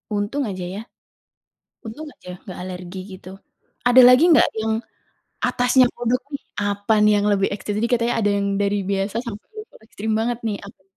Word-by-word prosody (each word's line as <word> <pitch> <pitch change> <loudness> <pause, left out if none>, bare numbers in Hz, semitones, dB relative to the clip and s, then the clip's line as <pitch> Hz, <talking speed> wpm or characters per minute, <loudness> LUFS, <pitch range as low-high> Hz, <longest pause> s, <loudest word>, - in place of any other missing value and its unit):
Untung 205 +8 -1
aja 185 -2 -5
ya. 205 - -5 1.0
Untung 265 +8 -7
aja - - -20 0.2
gak 185 - -8
alergi 180 0 -7 0.2
gitu. 185 - -12 0.6
Ada 245 +1 +6
lagi 250 +4 +7
nggak, 310 - +6
yang 220 0 0 0.7
atasnya 250 +1 +3
kodok 240 +2 0
nih 280 - -5 0.2
apa 205 +1 0
nih 210 - +5
yang 205 - 0
lebih 195 -1 +1
ekstrim? 205 0 -4
Tadi 235 - 0
katanya 235 0 +1
ada 205 - +2
yang 200 0 -1
dari 205 0 +1
biasa 195 +2 -1
sampai 215 -3 -7
level 430 - -11
ekstrim 220 0 -4
banget 235 +1 -1
nih, 210 -2 -2
apa 200 -1 -15
210 Hz, 175 wpm, -21 LUFS, 200-240 Hz, 1.0 s, lagi